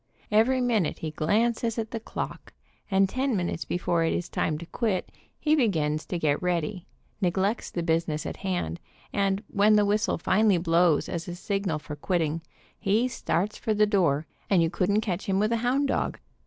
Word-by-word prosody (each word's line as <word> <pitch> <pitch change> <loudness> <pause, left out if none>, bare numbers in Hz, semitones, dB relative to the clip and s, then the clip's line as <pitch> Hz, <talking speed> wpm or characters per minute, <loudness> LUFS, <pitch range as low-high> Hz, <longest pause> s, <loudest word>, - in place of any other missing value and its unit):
Every 240 +5 +4
minute 225 -9 +1
he 155 - -4
glances 225 +9 +1
at 220 -1 -3
the 230 - -3
clock, - - -6 0.4
and 195 -1 +4
ten 255 +2 0
minutes 175 -2 -2
before 170 -1 0
it 165 - +1
is 175 - -3
time 155 - -1
to 170 - -8
quit 200 -1 -2 0.3
he 310 0 +3
begins 155 - +1
to 180 - -2
get 150 -3 +1
ready, 180 +1 -1 0.3
neglects 195 +4 0
the 170 - -3
business 160 -2 0
in - - -3
hand, 175 - -3 0.3
and 200 0 +1
when 210 +1 +4
the 210 -1 +4
whistle 210 +1 +1
finally 190 +3 +3
blows 170 -2 +3
as 170 -1 -4
a 175 - -5
signal 195 -3 -1
for 150 0 -7
quitting, 165 0 -1 0.4
he 215 +6 +2
'starts 210 -4 -1
for 220 - 0
the 210 0 +5
door, 170 -8 +2 0.2
and 185 -4 +4
you 165 - 0
couldn't 195 +4 +1
catch 195 -4 -3
him 190 -1 +1
with 215 +3 +2
a 230 - +2
hound 260 +4 +1
dog. - - -1
190 Hz, 185 wpm, -27 LUFS, 165-215 Hz, 0.4 s, the